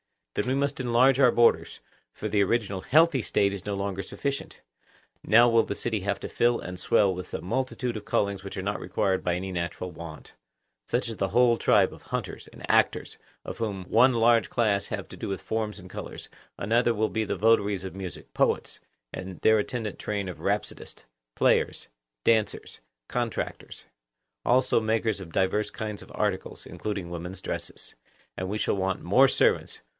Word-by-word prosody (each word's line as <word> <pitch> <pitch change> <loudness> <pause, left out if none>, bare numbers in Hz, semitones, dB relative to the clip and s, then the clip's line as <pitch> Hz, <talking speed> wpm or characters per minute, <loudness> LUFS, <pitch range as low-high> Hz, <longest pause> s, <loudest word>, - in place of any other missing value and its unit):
Then - - -1
we 130 - +1
must 140 0 -1
enlarge 125 +2 +4
our 125 - +7
borders; 120 0 +3 0.3
for 110 - -5
the 105 0 +2
original 100 -1 0
healthy 155 - +4
State 100 -1 +1
is 100 -3 -6
no 105 -1 -2
longer 100 -1 -2
sufficient. 140 +8 -4 0.6
Now 120 +2 +6
will 115 -1 +5
the 100 - -4
city 110 -1 -2
have 100 +1 -2
to - - -5
fill 120 0 +2
and 90 0 -7
swell 95 +1 +3
with 90 0 -8
a - - -4
multitude 125 +3 -2
of 105 - -9
callings 100 -1 0
which 100 - -7
are 95 - -3
not 100 +1 -2
required 95 -1 0
by 90 - +1
any 95 +2 -4
natural 85 0 -4
want; 80 -2 -10 0.5
such 120 -1 -1
as 115 - -6
the 95 - 0
whole 120 +2 +4
tribe - - +3
of - - -13
hunters - - -5
and - - -10
actors, - - +2 0.3
of - - -7
whom 105 -5 -3
one 120 +7 +4
large 115 0 +4
class 105 -4 +1
have - - -5
to - - -10
do - - -5
with 95 -1 -3
forms 110 -2 -2
and 90 0 -12
colours; - - -8 0.3
another 115 +3 +2
will 110 +1 +1
be 110 -1 -1
the - - -2
votaries 105 -3 +2
of 95 - -6
music—poets 95 -1 -2 0.3
and 95 -2 -7
their 110 0 +5
attendant 110 0 -3
train 100 -2 -3
of 90 - -8
rhapsodists, - - -3 0.3
players, - - +2 0.3
dancers, 110 -3 +1 0.3
contractors; 120 -2 -4 0.6
also 130 0 +3
makers 110 -1 0
of 85 -4 -10
divers 105 +2 +1
kinds 105 -1 -5
of - - -13
articles, 105 -3 -2
including 100 -5 -5
women's 90 +2 -6
dresses. - - -5 0.4
And 95 - -3
we 105 - -2
shall 105 - 0
want 95 0 -1
more 125 +10 +5
servants. - - +1
105 Hz, 180 wpm, -27 LUFS, 95-115 Hz, 0.6 s, our